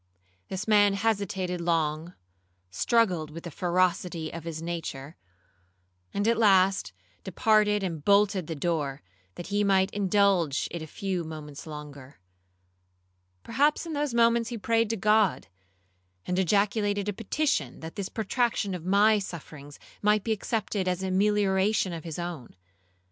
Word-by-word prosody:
This 190 Hz, +3 st, -5 dB
man 205 Hz, -2 st, +5 dB
hesitated 195 Hz, -4 st, -1 dB
long, 165 Hz, 0 st, -1 dB, 0.6 s
struggled 180 Hz, -, +1 dB
with 165 Hz, +2 st, -9 dB
the 170 Hz, -, -7 dB
ferocity 175 Hz, -2 st, 0 dB
of 165 Hz, -1 st, -7 dB
his 165 Hz, -2 st, -5 dB
nature, 165 Hz, -4 st, -5 dB, 1.0 s
and 205 Hz, +2 st, -1 dB
at 230 Hz, 0 st, +2 dB
last 195 Hz, -, +4 dB, 0.3 s
departed 210 Hz, +1 st, +2 dB
and 165 Hz, -5 st, -4 dB
bolted 200 Hz, -3 st, +3 dB
the 165 Hz, -, -4 dB
door, 145 Hz, -3 st, -2 dB, 0.3 s
that 175 Hz, -, -7 dB
he 205 Hz, 0 st, +1 dB
might 190 Hz, -1 st, +3 dB
indulge 195 Hz, -6 st, +2 dB
it 170 Hz, -, -5 dB
a 160 Hz, -, -7 dB
few 185 Hz, +2 st, -3 dB
moments 155 Hz, -2 st, -9 dB
longer. 145 Hz, -4 st, -10 dB, 1.2 s
Perhaps 295 Hz, +4 st, +1 dB
in 330 Hz, -, -5 dB
those 290 Hz, -4 st, -1 dB
moments 235 Hz, -1 st, +3 dB
he 240 Hz, -, -4 dB
prayed 230 Hz, +1 st, +1 dB
to 225 Hz, -, -1 dB
God, 210 Hz, -, +2 dB, 0.8 s
and 180 Hz, +1 st, -1 dB
ejaculated 205 Hz, +2 st, +1 dB
a 205 Hz, -, -1 dB
petition, 220 Hz, -, -1 dB
that 160 Hz, 0 st, -8 dB
this 195 Hz, -2 st, -4 dB
protraction 220 Hz, -2 st, -1 dB
of 180 Hz, -3 st, -5 dB
my 205 Hz, +4 st, +4 dB
sufferings 150 Hz, -6 st, -9 dB, 0.2 s
might 210 Hz, 0 st, +3 dB
be 225 Hz, -, -2 dB
accepted 210 Hz, -2 st, -2 dB
as 180 Hz, +1 st, -1 dB
a 190 Hz, -, -2 dB
melioration 200 Hz, -1 st, +2 dB
of 165 Hz, -, -8 dB
his 160 Hz, -2 st, -5 dB
own. 170 Hz, -, -6 dB
190 Hz, 145 wpm, -27 LUFS, 165-210 Hz, 1.2 s, man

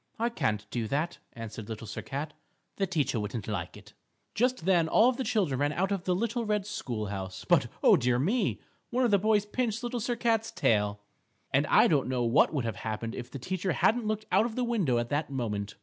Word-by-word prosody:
"I 235 Hz, +1 st, +1 dB
can't 110 Hz, -, -1 dB
do 115 Hz, -2 st, -2 dB
that," 150 Hz, +8 st, -2 dB
answered 110 Hz, -1 st, -8 dB
Little 110 Hz, 0 st, -6 dB
Sir 110 Hz, -, -5 dB
Cat, 145 Hz, +2 st, -5 dB, 0.4 s
"the 195 Hz, -, +1 dB
teacher 150 Hz, -9 st, 0 dB
wouldn't 105 Hz, 0 st, -4 dB
like 95 Hz, -5 st, -4 dB
it." -, -, -15 dB, 0.4 s
Just 245 Hz, -5 st, 0 dB
then 175 Hz, -4 st, +4 dB
all 230 Hz, +9 st, +5 dB
the 260 Hz, +1 st, -3 dB
children 180 Hz, -, 0 dB
ran 145 Hz, +1 st, +1 dB
out 190 Hz, +4 st, 0 dB
of 190 Hz, -3 st, -2 dB
the 180 Hz, -, +2 dB
little 235 Hz, +4 st, -1 dB
red 210 Hz, -2 st, 0 dB
school 120 Hz, -, -4 dB
house. 95 Hz, -2 st, -6 dB
But, -, -, +4 dB, 0.2 s
oh, -, -, +8 dB
dear 120 Hz, 0 st, +2 dB
me! 195 Hz, -, +1 dB, 0.3 s
One 250 Hz, +1 st, +1 dB
of 235 Hz, -, +2 dB
the 200 Hz, -, +5 dB
boys 210 Hz, 0 st, +2 dB
pinched 225 Hz, +1 st, -2 dB
Little 240 Hz, 0 st, -2 dB
Sir 240 Hz, +2 st, -1 dB
Cat's 225 Hz, -1 st, +1 dB
tail. 105 Hz, -1 st, +1 dB, 0.5 s
And -, -, +3 dB
I -, -, +6 dB
don't 140 Hz, -5 st, +2 dB
know 125 Hz, -2 st, 0 dB
what 120 Hz, +3 st, +4 dB
would 140 Hz, -6 st, -1 dB
have 115 Hz, -, -3 dB
happened 115 Hz, +1 st, -4 dB
if 125 Hz, -1 st, -6 dB
the -, -, -7 dB
teacher 185 Hz, +6 st, -2 dB
hadn't 225 Hz, -1 st, +2 dB
looked 215 Hz, 0 st, -2 dB
out 225 Hz, -, +4 dB
of 225 Hz, -, -8 dB
the 255 Hz, -, 0 dB
window 200 Hz, -, +1 dB
at 120 Hz, 0 st, -1 dB
that 145 Hz, +1 st, -1 dB
moment. 105 Hz, -6 st, -3 dB
160 Hz, 225 wpm, -29 LUFS, -, 0.5 s, oh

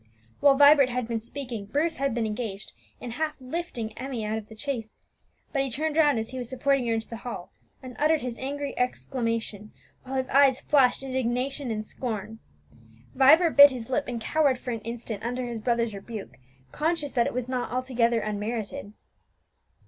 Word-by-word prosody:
While 280 Hz, -1 st, +6 dB
Vibert 285 Hz, -2 st, +7 dB
had 250 Hz, -2 st, -2 dB
been 230 Hz, -1 st, -2 dB
speaking, 235 Hz, -4 st, -6 dB
Bruce 315 Hz, +8 st, 0 dB
had 275 Hz, -3 st, 0 dB
been 235 Hz, -2 st, 0 dB
engaged 210 Hz, -2 st, -4 dB, 0.3 s
in 245 Hz, -, -6 dB
half 310 Hz, +5 st, -3 dB
lifting 255 Hz, -6 st, -5 dB
Emmie 255 Hz, -4 st, -4 dB
out 215 Hz, +1 st, -1 dB
of 215 Hz, -, -14 dB
the 220 Hz, -, -12 dB
chaise; 230 Hz, -3 st, -4 dB, 0.6 s
but 275 Hz, -, +2 dB
he 270 Hz, -, -1 dB
turned 300 Hz, +5 st, -1 dB
round 295 Hz, -5 st, +4 dB
as 225 Hz, 0 st, -3 dB
he 260 Hz, -, -6 dB
was 245 Hz, -2 st, -5 dB
supporting 265 Hz, -1 st, +1 dB
her 230 Hz, -, +2 dB
into 225 Hz, 0 st, -4 dB
the 230 Hz, -, -7 dB
hall, 230 Hz, -6 st, -7 dB, 0.3 s
and 255 Hz, -1 st, -9 dB
uttered 310 Hz, +1 st, +3 dB
his 245 Hz, -2 st, -5 dB
angry 285 Hz, +1 st, -3 dB
exclamation, 230 Hz, -4 st, -2 dB, 0.3 s
while 265 Hz, +1 st, -6 dB
his 260 Hz, -1 st, 0 dB
eyes 270 Hz, -1 st, +5 dB
flashed 270 Hz, -3 st, +3 dB
indignation 260 Hz, +1 st, -2 dB
and 215 Hz, -1 st, -3 dB
scorn. 220 Hz, -2 st, -5 dB, 0.7 s
Vibert 310 Hz, +6 st, +6 dB
bit 285 Hz, 0 st, +11 dB
his 250 Hz, -2 st, -7 dB
lip 285 Hz, +2 st, +1 dB
and 245 Hz, -2 st, -3 dB
cowered 280 Hz, +2 st, +2 dB
for 250 Hz, -, -5 dB
an 230 Hz, -2 st, -4 dB
instant 230 Hz, -2 st, -6 dB
under 245 Hz, +2 st, -2 dB
his 235 Hz, -2 st, -5 dB
brother's 235 Hz, -1 st, 0 dB
rebuke, 205 Hz, +1 st, -8 dB, 0.3 s
conscious 310 Hz, -2 st, -1 dB
that 235 Hz, -2 st, +2 dB
it -, -, -3 dB
was 250 Hz, -1 st, -2 dB
not 255 Hz, -1 st, -2 dB
altogether 240 Hz, -2 st, +1 dB
unmerited. 215 Hz, +2 st, -4 dB
250 Hz, 185 wpm, -27 LUFS, 225-275 Hz, 0.7 s, bit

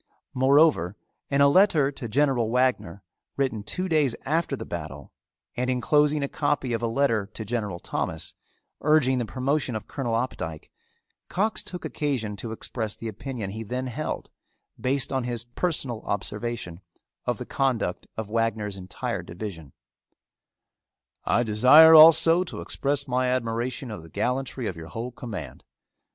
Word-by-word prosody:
Moreover 130 Hz, -, +3 dB, 0.3 s
in 140 Hz, 0 st, +2 dB
a 140 Hz, -, +7 dB
letter 155 Hz, -4 st, +4 dB
to 135 Hz, -3 st, -7 dB
General 125 Hz, -1 st, +1 dB
Wagner, 120 Hz, -7 st, 0 dB, 0.3 s
written 130 Hz, -6 st, 0 dB
two 185 Hz, -, -3 dB
days 150 Hz, -8 st, +2 dB
after 160 Hz, 0 st, 0 dB
the -, -, -7 dB
battle, 75 Hz, -4 st, -7 dB, 0.4 s
and 125 Hz, +1 st, -1 dB
inclosing 145 Hz, +4 st, +2 dB
a -, -, 0 dB
copy 145 Hz, -4 st, -1 dB
of 115 Hz, -, -1 dB
a 120 Hz, -, 0 dB
letter 115 Hz, -4 st, +1 dB
to 110 Hz, +1 st, -8 dB
General 105 Hz, -5 st, -3 dB
Thomas, -, -, -4 dB, 0.5 s
urging 140 Hz, -4 st, +3 dB
the 120 Hz, -, -2 dB
promotion 135 Hz, 0 st, -1 dB
of 110 Hz, -1 st, -5 dB
Colonel 120 Hz, -5 st, -2 dB
Opdycke, 80 Hz, -10 st, -4 dB, 0.6 s
Cox 215 Hz, +4 st, 0 dB
took 180 Hz, -2 st, -7 dB
occasion 125 Hz, -8 st, -2 dB
to 110 Hz, +2 st, -5 dB
express 110 Hz, -1 st, -4 dB
the 115 Hz, -, -7 dB
opinion 110 Hz, -1 st, -5 dB
he 110 Hz, +3 st, -6 dB
then 125 Hz, +4 st, -3 dB
held, 135 Hz, +5 st, -4 dB, 0.5 s
based 135 Hz, +1 st, 0 dB
on 130 Hz, -1 st, 0 dB
his 120 Hz, -2 st, -3 dB
personal 120 Hz, -3 st, -2 dB
observation, 105 Hz, -3 st, -4 dB, 0.5 s
of -, -, 0 dB
the -, -, -6 dB
conduct 125 Hz, -9 st, -1 dB
of 110 Hz, -2 st, -3 dB
Wagner's 110 Hz, -2 st, -1 dB
entire 95 Hz, 0 st, -4 dB
division: 85 Hz, -6 st, -8 dB, 1.5 s
I 120 Hz, -, +2 dB
desire 130 Hz, +9 st, +7 dB
also 165 Hz, +2 st, +8 dB
to -, -, -7 dB
express 140 Hz, 0 st, -1 dB
my 130 Hz, 0 st, +1 dB
admiration 120 Hz, 0 st, -2 dB
of 105 Hz, -, -6 dB
the 80 Hz, -, -14 dB
gallantry 125 Hz, -, -2 dB
of 95 Hz, -, -3 dB
your 80 Hz, -1 st, -9 dB
whole 115 Hz, +9 st, -5 dB
command. 105 Hz, -, -7 dB
125 Hz, 150 wpm, -26 LUFS, 110-140 Hz, 1.5 s, also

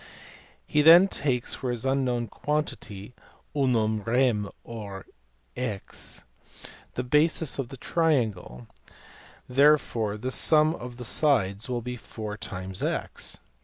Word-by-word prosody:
He 150 Hz, -, +2 dB
then 170 Hz, +5 st, +8 dB
takes 130 Hz, -9 st, -1 dB
for 130 Hz, -, -4 dB
his 120 Hz, +1 st, -2 dB
unknown 130 Hz, -3 st, 0 dB
quantity 125 Hz, -7 st, -4 dB, 0.4 s
(unam 115 Hz, -6 st, +1 dB
rem 115 Hz, -3 st, +1 dB
or 105 Hz, -5 st, -8 dB, 0.5 s
x) 115 Hz, -6 st, -4 dB, 0.7 s
the 125 Hz, -, -2 dB
base 150 Hz, +3 st, +2 dB
of 130 Hz, -3 st, -3 dB
the 135 Hz, -, -9 dB
triangle, 115 Hz, -, -1 dB, 0.8 s
and 125 Hz, -, -11 dB
therefore 130 Hz, -8 st, +3 dB
the 125 Hz, +4 st, -4 dB
sum 155 Hz, +3 st, +4 dB
of 120 Hz, -6 st, -8 dB
the 125 Hz, -, -6 dB
sides 110 Hz, -6 st, +1 dB
will 120 Hz, -2 st, -2 dB
be 125 Hz, 0 st, -5 dB
x. 100 Hz, -4 st, -4 dB
125 Hz, 115 wpm, -26 LUFS, 105-140 Hz, 0.8 s, then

